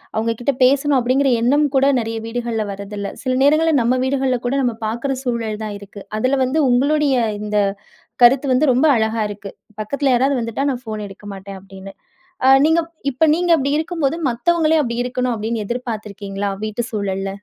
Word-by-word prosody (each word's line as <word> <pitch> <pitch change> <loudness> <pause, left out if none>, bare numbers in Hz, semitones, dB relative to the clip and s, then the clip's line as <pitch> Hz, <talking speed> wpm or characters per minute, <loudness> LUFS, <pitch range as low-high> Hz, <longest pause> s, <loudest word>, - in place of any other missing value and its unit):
அவங்க 225 +1 0
கிட்ட 280 +3 +1
பேசணும் 275 +2 +3
அப்படிங்கிற 260 +2 +2
எண்ணம் 290 +5 +3
கூட 270 +1 +4
நெறைய 225 0 -3
வீடுகள்ல 230 -2 -3
வர்றதில்லை. 200 0 -6
சில 255 -1 0
நேரங்கள்ல 310 +2 +3
நம்ம 250 +2 +1
வீடுகள்ல 260 -2 0
கூட 270 - 0
நம்ம 240 -3 0
பார்க்குற 240 +5 -2
சூழல் 225 -3 -3
தான் 210 -1 -5
இருக்கு. 200 0 -11
அதுல 255 +5 +1
வந்து 305 +5 0
உங்களுடைய 275 +1 +2 0.2
இந்த 210 0 -2 0.7
கருத்து 265 +3 +6
வந்து, 260 +4 +3
ரொம்ப 265 +6 +3
அழகா 220 0 0
இருக்கு. 200 -1 -8 0.3
"பக்கத்தில 275 +5 0
யாராவது 265 +2 +2
வந்துட்டா 230 +3 -3
நான் 250 -1 -4
ஃபோன் 215 -1 -5
எடுக்க 195 +1 -13
மாட்டேன்." 195 0 -9
அப்படின்னு. 195 0 -11 0.6
அ - - +6 0.2
நீங்க 320 +2 +3 0.3
இப்ப 260 +6 -1
நீங்க 350 0 -1
அப்படி 280 0 -1
இருக்கும்போது, 320 -2 -1
மத்தவங்களையும் 315 +5 +2
அப்படி 235 0 -2
இருக்கணும் 250 0 -1
அப்படின்னு 220 +1 -3
எதிர்பார்த்திருக்கீங்களா? 210 -4 -4
வீட்டு 215 -1 -6
சூழல்ல. 195 -2 -2
245 Hz, 170 wpm, -19 LUFS, 215-275 Hz, 0.7 s, கருத்து